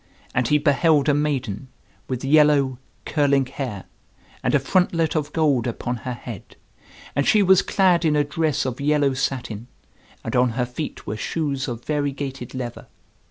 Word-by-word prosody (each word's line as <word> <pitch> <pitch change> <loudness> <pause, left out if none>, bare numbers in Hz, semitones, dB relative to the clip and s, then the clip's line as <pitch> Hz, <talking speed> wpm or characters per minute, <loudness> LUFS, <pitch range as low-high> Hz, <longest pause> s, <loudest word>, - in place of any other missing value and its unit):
And 125 -1 +1
he 150 - +4
beheld 145 0 +3
a - - +4
maiden, 135 -6 -1 0.4
with 130 0 -4
yellow, 145 -3 +4 0.3
curling 140 -3 +2
hair, 125 -7 -5 0.6
and - - +1
a - - +5
frontlet 165 -3 +1
of 150 -1 -1
gold 145 -7 +1
upon 120 +1 -3
her 125 +2 -5
head; 120 -4 -10 0.6
and 140 - +1
she 210 -2 +5
was 190 0 +6
clad 185 -3 +2
in 155 -2 +2
a 150 - +3
dress 155 -1 -1
of 130 +1 -4
yellow 145 -1 +2
satin, 125 -4 -3 0.6
and 115 - -4
on 125 0 +4
her 125 - +1
feet 125 +5 -6
were 105 - -4
shoes 140 -1 -2
of 120 -2 -6
variegated 140 -4 -3
leather. 125 -2 -6
140 Hz, 160 wpm, -23 LUFS, 125-150 Hz, 0.6 s, was